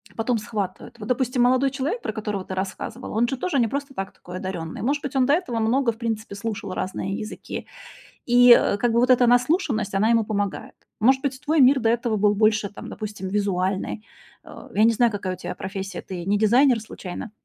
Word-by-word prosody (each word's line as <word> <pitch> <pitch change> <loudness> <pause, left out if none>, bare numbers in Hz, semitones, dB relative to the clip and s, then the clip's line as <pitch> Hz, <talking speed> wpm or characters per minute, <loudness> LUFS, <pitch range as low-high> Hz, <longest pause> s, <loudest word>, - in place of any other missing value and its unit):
потом 230 +1 0
схватывает. 210 +1 -5
Вот, 210 - -7
допустим, 250 0 0
молодой 255 +2 +3
человек, 290 - -2
про 220 - -4
которого 210 -3 -4
ты - - -6
рассказывала, 195 +6 -5
он 235 +2 +2
же 265 +1 -3
тоже 285 -3 -1
не 235 - +3
просто 280 +3 -4
так 195 0 -5
такой 180 +1 -9
одаренный. 175 -4 -5
Может 285 +3 0
быть, 280 0 -6
он 260 -1 +4
до 280 - +3
этого 260 -10 -1
много 235 +3 +2
в 225 - -13
принципе 225 -3 -4
слушал 200 -3 -4
разные 190 +1 -3
языки, 215 - -6 0.6
и, 245 0 +7
э, 205 - +3
как 240 +3 +1
бы 235 - +2
вот 250 +1 +2
эта 250 -1 +5
наслушанность, 245 - +2
она 215 +3 +3
ему 230 -1 +4
помогает. 205 -2 -3 0.2
Может 265 +4 +4
быть, 265 -1 -2
твой 310 +1 +1
мир 265 +1 +6
до 225 -2 +1
этого 235 -1 0
был 210 0 +3
больше, 215 -1 +2
там, 205 - -10
допустим, 205 -3 -6
визуальный. 195 +1 -1 0.4
Э, - - -12
я 215 - +4
не 230 - +5
знаю, 235 0 +3
какая 190 -2 -3
у - - -8
тя - - -6
профессия, 195 -1 -6
ты 180 -2 -6
не 200 +3 +1
дизайнер 240 +4 +4
случайно? 205 -1 -8
225 Hz, 215 wpm, -23 LUFS, 200-250 Hz, 0.6 s, и